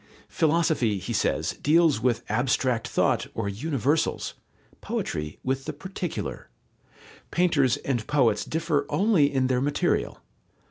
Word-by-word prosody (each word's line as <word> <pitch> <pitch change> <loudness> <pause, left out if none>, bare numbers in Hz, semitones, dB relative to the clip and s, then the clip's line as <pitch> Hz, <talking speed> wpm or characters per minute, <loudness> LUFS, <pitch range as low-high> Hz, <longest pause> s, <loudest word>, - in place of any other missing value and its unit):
Philosophy, 155 -9 +1
he 95 +6 -5
says, - - 0
deals 155 -4 +4
with 120 -1 +1
abstract 125 -1 0
thought - - +1
or 115 -2 -2
universals, 140 +7 -1 0.5
poetry 75 0 -3
with 135 +1 -2
the 155 - -4
particular. 180 +3 -5 0.8
Painters 150 -9 +2
and 120 -5 -3
poets 120 -8 +2
differ 160 -3 -1
only 190 -8 +3
in 130 -2 +1
their 130 -1 +1
material. 145 +1 0
135 Hz, 120 wpm, -26 LUFS, 120-160 Hz, 0.8 s, deals